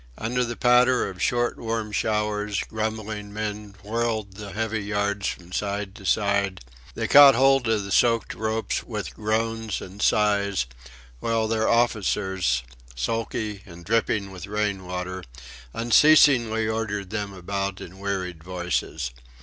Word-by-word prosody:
Under 125 +3 -1
the 120 0 -3
patter 125 +1 +4
of 95 -2 -8
short 120 0 +1
warm 115 -2 -3
showers, 105 -2 0
grumbling 110 -1 -4
men 105 -1 -5
whirled 110 -2 -2
the 100 0 -8
heavy 110 0 -2
yards 100 -1 -1
from 90 0 -6
side 100 0 -2
to 100 -2 -9
side; 100 - +1 0.3
they - - -2
caught 140 -1 +9
hold 135 -1 +4
of 110 -2 +1
the 100 - -7
soaked 115 +2 +3
ropes 110 0 -2
with - - -5
groans 110 -1 -1
and 95 +2 -9
sighs, 100 -7 +2 0.5
while 115 - 0
their 110 0 +1
officers, 95 - +1 0.3
sulky 105 - -3
and 85 -1 -12
dripping 105 -3 0
with 90 0 -8
rain 100 -3 -2
water, 90 0 -4 0.5
unceasingly 120 - +5
ordered 105 -3 -3
them 105 -2 -3
about 100 +1 -3
in 95 +3 -10
wearied 95 -5 -3
voices. 90 -6 -3
105 Hz, 135 wpm, -25 LUFS, 100-115 Hz, 0.5 s, caught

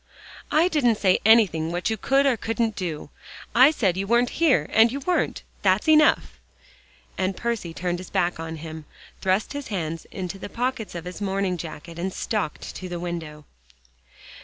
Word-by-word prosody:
"I 320 +3 +4
didn't 280 -10 +2
say 190 -3 +3
anything 195 -8 +4
what 175 +5 -1
you - - +1
could 270 +6 +2
or 270 -3 +4
couldn't 225 0 -1
do. 165 -6 -5 0.4
I 255 +4 +8
said 200 - 0
you 195 +1 -2
weren't 240 +2 +3
here, 270 - +4
and 225 +1 +6
you 280 +2 -4
weren't. 360 +5 -1 0.2
That's 190 +4 +2
enough," 310 -1 +4 0.8
and 185 0 -1
Percy 230 -8 -2
turned 175 +1 -3
his 185 - -9
back 175 -1 0
on 165 0 -5
him, 160 0 -8 0.4
thrust 190 +6 0
his 285 -1 -5
hands 165 -5 -4
in 190 - -4
the 195 +3 -7
pockets 240 -4 -3
of 170 0 -6
his 180 +3 -7
morning 195 -2 0
jacket 165 0 -8
and 190 +2 -2
stalked 205 -5 -3
to 185 - -7
the 175 -1 -4
window. 160 -4 -6
190 Hz, 175 wpm, -24 LUFS, 170-235 Hz, 0.8 s, I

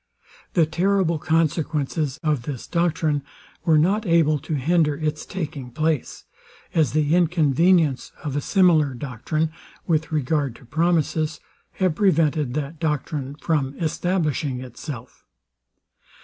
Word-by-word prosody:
The 170 -3 +4
terrible 175 0 +1
consequences 155 -3 0
of 150 -5 +1
this 130 0 -6
doctrine 165 -4 0 0.4
were 160 -2 +5
not 195 +8 +2
able 160 -3 +3
to 155 +2 -3
hinder 150 +1 +2
its 155 -1 -3
taking 150 -8 -5
place; 155 +3 -1 0.5
as 155 -5 +2
the 155 0 +2
inconvenience 165 -3 +3
of 145 -3 -3
a 145 - 0
similar 160 -7 +3
doctrine, 150 +5 -2 0.3
with 160 -2 0
regard 145 -3 0
to - - -16
promises, 160 +1 0 0.3
have 185 -3 +1
prevented 155 -7 +2
that 150 +1 -4
doctrine 150 -3 -2
from 145 -3 -1
establishing 160 -5 -1
itself. 125 0 -9
155 Hz, 120 wpm, -23 LUFS, 145-165 Hz, 0.5 s, were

